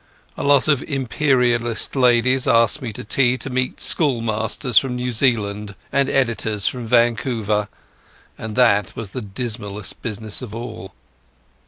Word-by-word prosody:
A - - -6
lot 140 -1 +4
of 145 -4 +2
Imperialist 125 -4 0
ladies 125 0 +3
asked 115 +4 +3
me 120 -4 -5
to - - -7
tea 125 +3 +1
to 130 +2 -5
meet 130 0 -2
schoolmasters 115 -3 +2
from 130 -2 -4
New 125 0 -3
Zealand 105 -5 0 0.2
and 140 0 +1
editors 110 -5 +1
from 125 -3 -2
Vancouver, 115 -3 +1 0.7
and 110 -1 -7
that 105 -6 +2
was 110 -4 -7
the 130 - -5
dismalest 105 -1 -4
business 110 0 -3
of 115 -4 -8
all. 110 -5 -8
120 Hz, 140 wpm, -20 LUFS, 110-130 Hz, 0.7 s, lot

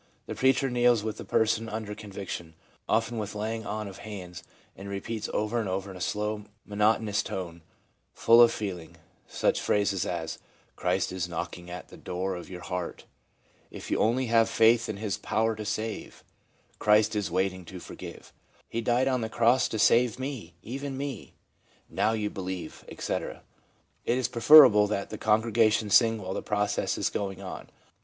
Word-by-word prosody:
The - - -5
preacher 135 +1 +3
kneels 120 -3 +3
with 110 -1 -3
the - - -7
person 110 0 +1
under 110 -1 -4
conviction, 95 -6 -7 0.3
often 115 +1 +1
with 105 0 -5
laying 110 +2 -3
on 105 0 -3
of 95 -1 -10
hands, 90 -5 -8 0.3
and 100 +1 -9
repeats 105 +2 -4
over 110 +3 0
and 105 -4 -2
over 95 +1 -3
in - - -10
a 90 - -9
slow, 105 +1 -2 0.2
monotonous 105 0 +1
tone, 85 -3 -6 0.5
full 115 +1 +6
of 120 - +7
feeling, 90 -6 -5 0.3
such - - 0
phrases 100 -3 +1
as 80 -2 -4 0.2
' - - -35
Christ - - 0
is 90 -2 -3
knocking 85 0 -5
at 90 0 -8
the - - -12
door 95 +2 -3
of 90 - -8
your 90 -1 -8
heart/ 90 -1 -5 0.7
i - - -13
If - - -8
only 120 +4 +2
you 120 - -4
have 115 -1 +4
faith 115 +1 +4
in 105 - -3
His 105 -1 -3
power 110 0 0
to 105 0 -6
save/ 110 +1 -4 0.3
* - - -36
Christ 105 +1 +4
is 105 -1 -1
waiting 95 +1 -1
to 90 +2 -9
forgive/ - - -10 0.2
' - - -33
He 115 - -1
died 120 +3 +2
on 130 -2 +1
the 110 - -3
Cross 120 +3 +3
to 110 - -4
save 120 +2 +4
me, 130 - -6
even 135 +3 -5
me/ 140 -1 -6 0.3
' - - -35
Now 105 +3 +1
you 105 -2 -2
believe/ 95 -3 -6
etc. - - -4 0.6
It 120 - +1
is 130 -2 +1
preferable 125 -4 +8
that 100 -1 -3
the 110 - -6
congregation 110 -1 +2
sing 115 +1 +5
while 95 -2 -5
the - - -3
process 105 0 -1
is - - 0
going 95 -2 -3
on. - - -8
105 Hz, 185 wpm, -28 LUFS, 95-115 Hz, 0.7 s, preferable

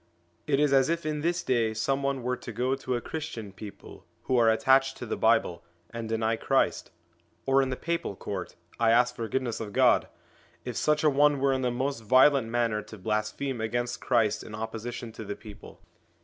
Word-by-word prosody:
It 140 -2 +2
is 145 -2 +3
as 135 0 +4
if 170 -1 -1
in 150 -1 -2
this 175 +3 0
day 115 -3 +1
some 135 +5 0
one 135 -2 -1
were 125 +1 0
to 120 - -9
go 125 +4 0
to 130 -2 -2
a 120 - -2
Christian 145 -10 -6
people 105 0 -11 0.2
who 130 - 0
are 115 -2 +5
attached 135 +3 +3
to - - -6
the 110 - -3
Bible, 110 -7 +2 0.3
and 115 -1 -5
deny 110 0 0
Christ; - - 0 0.6
or 135 0 +4
in 135 - -1
the 130 - -2
Papal 170 -9 -3
Court 95 -1 -6 0.2
I 115 -1 +3
ask 120 +2 +4
forgive 120 +3 -2
ness 120 -3 -3
of 105 -2 -6
God! - - +4 0.6
if - - -4
such 150 0 +1
a 155 - +5
one 145 0 +3
were 135 0 +2
in 130 - -1
the 125 - +1
most 130 0 -2
violent 130 +2 +5
manner 115 -2 0
to 110 - -12
blaspheme 110 +5 -2
against 120 +2 -2
Christ 115 -4 +1
in 105 - -8
opposition 110 +1 -5
to 110 - -8
the 100 -1 -5
people. 105 -2 -13
120 Hz, 205 wpm, -28 LUFS, 110-135 Hz, 0.6 s, are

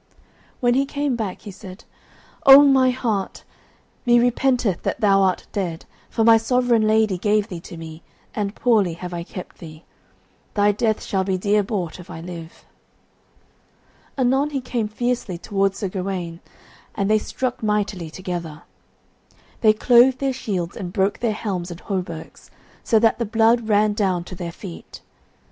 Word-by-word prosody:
When 245 -1 +3
he 275 +2 +1
came 285 -2 -1
back 215 -5 -4
he 205 - -9
said, 190 +2 -11 0.6
"O 275 +1 +11
my 265 -2 +5
white 250 - +1
hart, 215 -7 -2 0.6
me 240 0 +5
repenteth 245 -5 +1
that - - -2
thou 195 -2 +4
art 190 -2 +1
dead, 175 -5 -3 0.2
for 225 - 0
my 225 0 +7
sovereign 235 -1 +2
lady 215 -4 +2
gave 210 +2 +1
thee 175 - -6
to 170 0 -11
me, 160 0 -9 0.3
and 205 -1 -3
poorly 215 -8 +2
have 175 +1 -7
I 170 - -3
kept 180 +1 -9
thee. 155 -1 -11 0.7
Thy 205 0 +4
death 215 +1 -1
shall 190 -2 -1
be 190 -1 -1
dear 205 +3 +2
bought, 190 -5 -4
if 180 - -12
I - - -7
live." 165 -1 -9 1.5
Anon 265 +3 +2
he 285 -2 -2
came 245 -4 -2
fiercely 235 -4 -2
towards 195 +1 -1
Sir 200 - -2
Gawaine, 180 -3 -4 0.6
and 200 - 0
they 215 +1 +3
struck 250 +3 -4
mightily 210 -5 -1
together. 170 -3 -6 1.0
They 215 - +5
clove 245 +4 +5
their 270 -1 -1
shields 190 -9 -3
and 185 -5 -6
broke 195 +2 0
their 235 -2 0
helms 190 -5 -4
and 170 -1 -8
hauberks 180 -5 -6 0.3
so 225 - +3
that 225 +1 +3
the 235 - 0
blood 225 +1 +2
ran 210 0 +3
down 190 -4 0
to 180 - -10
their 175 -1 -5
feet. 85 - -10
205 Hz, 165 wpm, -22 LUFS, 180-235 Hz, 1.5 s, O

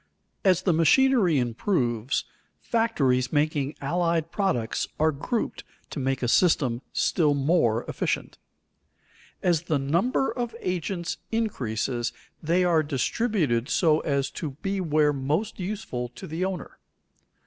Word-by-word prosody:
As 185 -2 +3
the 180 - +3
machinery 185 - +4
improves, 120 - 0 0.3
factories 135 - +1
making 145 -1 0
allied 165 +2 0
products 125 - 0
are 155 +1 +4
grouped 185 - -3 0.3
to - - -4
make 135 -1 -1
a - - +1
system 130 -5 +3
still 150 -5 +2
more 135 -6 +2
efficient. - - -2 1.0
As 175 -4 +3
the 155 -3 +1
number 170 - +1
of 240 -2 -4
agents 180 -2 -3
increases 125 - -1 0.3
they 170 +3 +2
are 170 -3 +4
distributed 150 - 0
so 160 -3 +3
as 140 -3 -1
to 145 -4 -6
be 195 0 -1
where 150 -3 +2
most 145 +12 -2
useful 180 -11 -4
to - - -8
the 170 +2 -2
owner. 190 -2 -5
155 Hz, 125 wpm, -26 LUFS, 135-185 Hz, 1.0 s, machinery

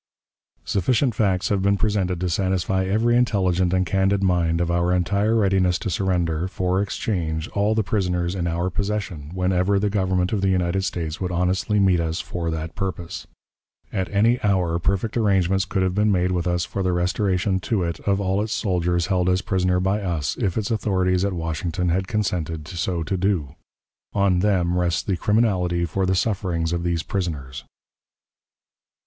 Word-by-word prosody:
Sufficient 120 +6 +1
facts 95 -4 +1
have 100 -2 +1
been 100 +1 +2
presented 95 -5 0
to 90 - 0
satisfy 95 +1 0
every 110 +5 +2
intelligent 95 -7 +2
and 95 0 +2
candid 95 +2 +1
mind 85 -3 +2
of 85 0 0
our 85 +1 +1
entire 100 +5 +1
readiness 95 -4 +2
to 100 - -4
surrender, 90 -4 0
for 95 0 0
exchange, 85 -6 -2
all 105 +2 +1
the 110 - +2
prisoners 90 -4 -1
in 90 -3 -2
our 85 +2 -1
possession, 100 -7 -3
whenever 90 +2 +1
the 100 +1 0
Government 95 -1 0
of 105 - 0
the 95 - +2
United 90 0 +1
States 85 -3 -3
would 90 -1 -2
honestly 90 +4 +1
meet 95 -3 +4
us 80 0 -1
for 85 -1 -4
that 80 0 -4
purpose. 90 -2 -5 0.7
At 95 -1 -1
any 115 +5 +2
hour 90 -5 +1
perfect 100 +5 -1
arrangements 95 -3 +2
could 95 0 -1
have 95 -1 0
been 105 +2 +2
made 90 -1 +1
with 90 -1 -1
us 90 0 0
for 100 - -4
the 90 -1 +1
restoration 95 +1 0
to 100 0 -1
it 85 0 -3
of 100 -1 0
all 95 0 0
its 110 +1 -2
soldiers 90 -4 0
held 90 -2 +1
as 90 0 +1
prisoners 90 -1 +1
by 100 +2 +1
us, 80 -8 -2
if 95 - -1
its 110 +1 -1
authorities 95 -4 +1
at 100 -1 0
Washington 85 +2 -2
had 95 +2 0
consented 85 -7 -2
so 90 -1 -2
to 95 - -2
do. 90 -7 0 0.6
On 100 -3 +2
them 90 -3 +1
rests 85 -2 0
the 95 - -1
criminality 90 -4 +1
for 95 +3 -1
the 95 - +2
sufferings 90 -5 -1
of 85 - -1
these 85 -1 -1
prisoners. 75 -9 -4
95 Hz, 180 wpm, -23 LUFS, 85-100 Hz, 0.7 s, meet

